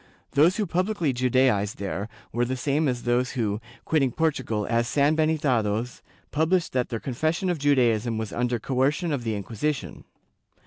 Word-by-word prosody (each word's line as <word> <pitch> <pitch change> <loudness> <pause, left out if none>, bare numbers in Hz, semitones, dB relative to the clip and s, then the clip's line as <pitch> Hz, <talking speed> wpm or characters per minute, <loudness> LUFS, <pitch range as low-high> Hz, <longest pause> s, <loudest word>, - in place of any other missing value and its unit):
Those 160 +6 +4
who 215 - 0
publicly 180 -4 0
Judaized 125 -5 +2
there 100 +1 -4 0.2
were 120 - 0
the 130 +2 -2
same 145 +4 +1
as 125 -2 -2
those 120 +1 +1
who, 110 -4 -1 0.2
quitting 140 -5 +2
Portugal 130 -9 -1
as 115 0 +1
sanhenitados, 140 -7 +1 0.3
published 165 +3 +1
that 125 -1 0
their 115 - -3
confession 155 - -1
of 170 - -3
Judaism 120 -5 +2
was 110 -2 -4
under 120 0 0
coercion 140 - 0
of 130 -4 -2
the 110 -2 -1
Inquisition. 115 +8 -3
130 Hz, 150 wpm, -25 LUFS, 115-155 Hz, 0.3 s, Those